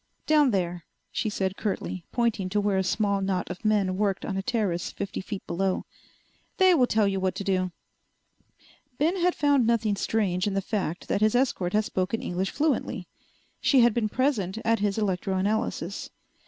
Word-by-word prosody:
"Down 300 -3 +5
there," 175 -5 -1 0.3
she 215 - -1
said 190 -2 -2
curtly, 190 -4 -3
pointing 230 -6 0
to 205 +2 +1
where 200 -2 +1
a - - +1
small 200 +1 +1
knot 190 -2 -1
of 180 - -8
men 200 -4 +2
worked 200 -2 0
on 195 - -3
a 195 - -1
terrace 200 -6 -1
fifty 200 - -4
feet 195 0 -6
below. 185 +2 -1 0.7
"They 375 -1 +6
will 255 -7 +4
tell 215 -3 +2
you 195 -1 0
what 185 -1 0
to 200 - -4
do." 185 -2 0 1.3
Ben 325 +6 +1
had 360 0 +2
found 285 -5 +3
nothing 225 -3 +2
strange 195 -3 0
in 200 - -1
the - - +2
fact 190 -4 -3
that - - 0
his 215 +2 +3
escort 235 -8 +1
had 215 0 +2
spoken 185 +4 -1
English 185 +2 -1
fluently. 300 0 -1 0.5
She 270 -3 +4
had 235 -1 +5
been 220 -2 0
present 225 -7 0
at 230 -1 +3
his 205 0 0
electroanalysis. 195 -1 -1
200 Hz, 180 wpm, -27 LUFS, 190-230 Hz, 1.3 s, They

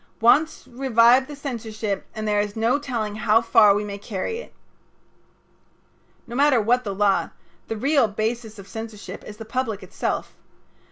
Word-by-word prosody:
Once 305 +8 +3
revive 250 0 +4
the 295 - -8
censorship 220 -7 -4
and 215 0 -4
there 210 -1 +2
is 205 0 -2
no 230 +5 +2
telling 225 -7 -3
how 215 +1 +4
far 215 -3 +5
we 205 - -1
may 200 -1 -6
carry 210 - -4
it." - - -11 1.7
No 235 - -8
matter 280 -2 +4
what 245 +4 +2
the 200 -2 -4
law, 200 -1 +2 0.4
the 225 - -3
real 275 +1 +3
basis 220 +1 -3
of 200 -1 -11
censorship 215 -3 -8
is 210 - -10
the 225 - -8
public 225 -3 -3
itself. - - -3
225 Hz, 160 wpm, -23 LUFS, 210-250 Hz, 1.7 s, far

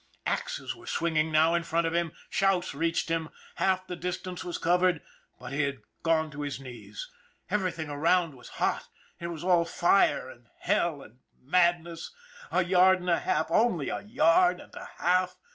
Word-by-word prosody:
Axes - - -2
were 345 -1 -15
swinging 160 -1 0
now 160 +2 +4
in 170 - +2
front 170 0 0
of 165 - -1
him, 170 -2 0 0.2
shouts 195 -2 +1
reached 165 +3 -1
him. 165 -1 -1 0.3
Half 185 -1 +1
the 180 -1 -5
distance 180 +1 -5
was 175 -2 -4
covered 180 -1 +2 0.4
but - - -8
he 140 - +1
had 140 -2 -2 0.2
gone 160 -1 +1
to 145 0 -7
his 145 -2 -4
knees. 130 - -9 0.4
Everything 185 -6 -1
around 160 +3 +1
was 125 -2 -13
hot, - - 0 0.3
it 170 - -4
was 170 -1 -6
all 175 -2 +4
fire 175 -3 +2
and 120 -2 -14
hell 155 -5 0
and 120 +4 -17 0.2
madness. 170 +2 +1 0.4
A 185 - +3
yard 185 +1 +5
and 180 0 -1
a 170 - +3
half 160 - -1
only 180 - +2
a - - -3
yard 180 -4 +3
and - - -14
a - - -9
half. 180 +1 +1
170 Hz, 180 wpm, -28 LUFS, 160-180 Hz, 0.4 s, yard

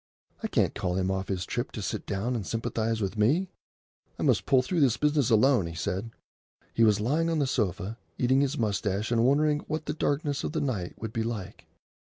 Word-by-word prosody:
"I - - -1
can't - - +1
call 90 -1 -2
him 95 0 0
off 95 0 -2
his 90 -2 -2
trip 120 - -3
to 110 - -5
sit 95 - -4
down 105 +6 -1
and 110 - -2
sympathise 115 +1 -2
with 100 +2 -2
me. 155 - +3 0.7
I - - -3
must - - +2
pull 130 -2 +4
through 175 +6 -1
this 130 -6 +3
business 150 -4 +2
alone," 115 -3 +4
he 85 - -7
said. 95 +5 -3 0.6
He 115 - +3
was 105 -2 +4
lying 150 +10 +1
on 165 - 0
the 145 - +2
sofa, 105 -3 -2 0.2
eating 130 +2 +3
his 140 -1 0
moustache 105 -1 -1
and 115 -1 +3
wondering 145 +3 +3
what 155 0 -3
the 150 - -2
darkness 145 -1 -1
of - - -3
the 160 - 0
night 105 -11 -2
would 110 -1 -5
be 115 - -1
like. 110 -4 -5
115 Hz, 215 wpm, -28 LUFS, 100-140 Hz, 0.7 s, pull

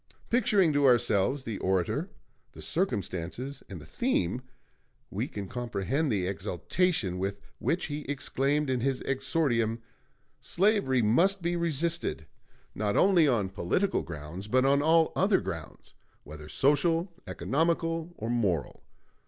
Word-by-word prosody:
Picturing 210 -9 +3
to 145 -1 +4
ourselves 120 +1 +3
the 110 -5 -5
orator, 95 -2 0 0.4
the - - -11
circumstances, 125 - -3
and 95 -4 -7
the 75 - -12
theme, 125 - -1 0.7
we - - -2
can 100 -2 -6
comprehend 120 - -2
the 95 -4 0
exaltation 95 - -1
with 100 +1 -2 0.2
which 170 - 0
he 145 0 -4
exclaimed 145 +1 0
in 130 -1 0
his 130 +1 -1
exordium: 130 -4 0 0.6
"Slavery 180 - +2
must 175 - +3
be 175 +1 0
resisted 165 - -1 0.5
not 105 -1 -1
only 180 -5 +5
on 110 -8 +1
political 100 - 0
grounds, 85 +5 -7
but 130 +4 +3
on 140 +1 +4
all 160 +1 +4
other - - +3
grounds, - - -7 0.3
whether 75 0 -10
social, 165 - +2
economical, 165 - -1
or 110 - -5
moral. 100 -10 -1
130 Hz, 130 wpm, -29 LUFS, 100-165 Hz, 0.7 s, only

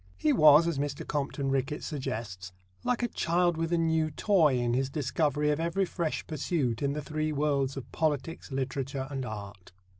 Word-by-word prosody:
He 150 +11 +2
was, 155 +1 +7
as 165 -5 -1
Mr. 140 -1 -3
Compton 140 -1 -2
Rickett 135 +3 -1
suggests, 115 - -5 0.3
like 245 -1 0
a - - +2
child 175 -4 +1
with 165 +1 -2
a 170 - +3
new 160 -1 +2
toy 155 -3 +3
in 120 -1 0
his 130 +2 +1
discovery 150 +1 0
of 150 - 0
ever 170 +4 +1
fresh 170 -3 -3
pursuits 145 -6 -1
in 140 0 +1
the 150 0 -4
three 155 +2 -2
worlds 140 -2 0
of 135 - -7
Politics, 155 0 -2
Literature 135 0 -2
and 135 -1 -3
Art. 100 -3 -8
145 Hz, 180 wpm, -29 LUFS, 135-160 Hz, 0.3 s, was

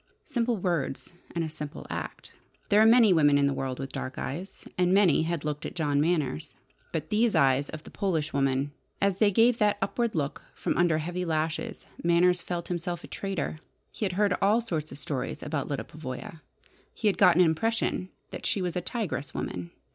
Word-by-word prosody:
Simple 235 -1 0
words, 175 -5 -2 0.2
and 170 - +1
a - - -2
simple 150 -2 -7
act. - - -6 0.4
There 210 0 +6
are 220 - +7
many 225 -4 +7
women 145 -3 +5
in 140 - +3
the 140 - +2
world 135 -1 -3
with 135 0 -5
dark 130 - -5
eyes, 180 +8 -5
and 180 +1 +3
many 195 -6 +5
had 160 -1 -2
looked 150 0 -3
at - - -6
John 145 -4 +1
Manners. 150 - 0 0.4
But 160 +6 -4
these 220 0 +3
eyes 140 -2 +3
of 155 0 -7
the - - -12
Polish 160 -6 -1
woman! 135 0 +1 0.3
As 195 -2 +2
they 210 0 +5
gave 230 +4 +4
that 210 -1 +3
upward 230 +3 -1
look 145 -3 -2
from - - -1
under 170 -2 +3
heavy 175 +3 -3
lashes 160 -1 -2 0.2
Manners 175 +1 +4
felt 175 -1 -4
himself 175 -1 -3
a - - -8
traitor. 190 -5 -3 0.3
He - - -6
had 185 - -1
heard 200 0 +2
all 205 +4 +4
sorts 165 -10 -3
of - - -8
stories 135 -3 -4
about 145 -4 -2
Lyda 140 -2 -2
Pavoya. 155 +1 -8 0.5
He - - -6
had 200 - +2
got 180 -3 +7
an 180 - +6
impression 185 +2 0 0.2
that - - -4
she 220 - +1
was 180 -1 -2
a 180 - 0
"tigress 175 - -4
woman." 90 -1 -4
170 Hz, 200 wpm, -28 LUFS, 150-195 Hz, 0.5 s, are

